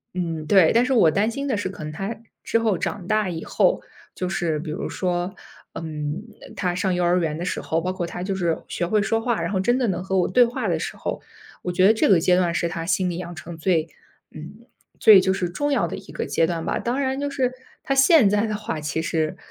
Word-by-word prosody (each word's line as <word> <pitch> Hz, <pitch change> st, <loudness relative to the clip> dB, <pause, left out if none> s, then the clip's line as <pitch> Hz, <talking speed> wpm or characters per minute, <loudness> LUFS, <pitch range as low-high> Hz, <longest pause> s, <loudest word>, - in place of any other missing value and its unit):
嗯 165 Hz, -4 st, -3 dB
对， 185 Hz, -4 st, +6 dB
但 235 Hz, -, +4 dB
是 260 Hz, +2 st, 0 dB
我 210 Hz, -10 st, +5 dB
担 205 Hz, +7 st, +1 dB
心 275 Hz, +4 st, -4 dB
的 260 Hz, -, 0 dB
是 205 Hz, -2 st, -2 dB
可 185 Hz, -4 st, -8 dB
能 150 Hz, 0 st, -6 dB
他 195 Hz, +7 st, -4 dB, 0.3 s
之 -, -, +1 dB
后 225 Hz, -3 st, +1 dB
长 175 Hz, +1 st, -4 dB
大 215 Hz, -2 st, +1 dB
以 165 Hz, -2 st, -5 dB
后， -, -, +1 dB, 0.3 s
就 185 Hz, -, -3 dB
是 175 Hz, -4 st, -1 dB
比 155 Hz, +1 st, -5 dB
如 155 Hz, -, -4 dB
说， 180 Hz, 0 st, -2 dB, 0.4 s
嗯， 150 Hz, +1 st, -4 dB, 0.2 s
呃 -, -, -12 dB
他 180 Hz, -2 st, -1 dB
上 185 Hz, 0 st, 0 dB
幼 180 Hz, -, 0 dB
儿 175 Hz, +1 st, +3 dB
园 155 Hz, -3 st, -1 dB
的 175 Hz, -, -4 dB
时 -, -, -2 dB
候， 160 Hz, -, -1 dB
包 185 Hz, +2 st, -2 dB
括 180 Hz, -2 st, -3 dB
他 175 Hz, +1 st, -6 dB
就 195 Hz, +1 st, -2 dB
是 170 Hz, -3 st, 0 dB
学 175 Hz, -, -2 dB
会 215 Hz, +4 st, +2 dB
说 225 Hz, +2 st, 0 dB
话， 235 Hz, -1 st, 0 dB
然 170 Hz, -, -2 dB
后 190 Hz, -, 0 dB
真 240 Hz, +6 st, +2 dB
的 255 Hz, -2 st, +1 dB
能 180 Hz, -1 st, -2 dB
和 190 Hz, 0 st, -1 dB
我 180 Hz, -, +2 dB
对 245 Hz, +7 st, +5 dB
话 240 Hz, 0 st, -2 dB
的 -, -, 0 dB
时 -, -, -5 dB
候， -, -, -4 dB, 0.4 s
我 180 Hz, -, -3 dB
觉 185 Hz, +1 st, +3 dB
得 210 Hz, -, +7 dB
这 220 Hz, -, +2 dB
个 190 Hz, -4 st, +6 dB
阶 180 Hz, +2 st, +3 dB
段 180 Hz, -2 st, +2 dB
是 170 Hz, -, 0 dB
他 165 Hz, 0 st, -4 dB
心 185 Hz, +1 st, 0 dB
里 170 Hz, -, -5 dB
养 175 Hz, -1 st, -6 dB
成 165 Hz, +2 st, -8 dB
最， 165 Hz, -2 st, +1 dB, 0.4 s
嗯， 200 Hz, +10 st, -11 dB, 0.3 s
最 210 Hz, -4 st, +8 dB
就 190 Hz, 0 st, +1 dB
是 190 Hz, -2 st, -1 dB
重 290 Hz, +11 st, -2 dB
要 280 Hz, -, +2 dB
的 -, -, -4 dB
一 -, -, -11 dB
个 -, -, -3 dB
阶 165 Hz, -, +1 dB
段 165 Hz, -1 st, -3 dB
吧， -, -, -1 dB
当 245 Hz, +3 st, -2 dB
然 265 Hz, -1 st, -1 dB
就 285 Hz, 0 st, -2 dB
是 260 Hz, -3 st, -1 dB, 0.3 s
他 275 Hz, -, 0 dB
现 275 Hz, -, +6 dB
在 210 Hz, +2 st, +2 dB
的 215 Hz, -, -2 dB
话， 210 Hz, -6 st, -4 dB
其 150 Hz, +1 st, -2 dB
实， 155 Hz, -1 st, -1 dB
185 Hz, 280 characters per minute, -23 LUFS, 170-220 Hz, 0.4 s, 最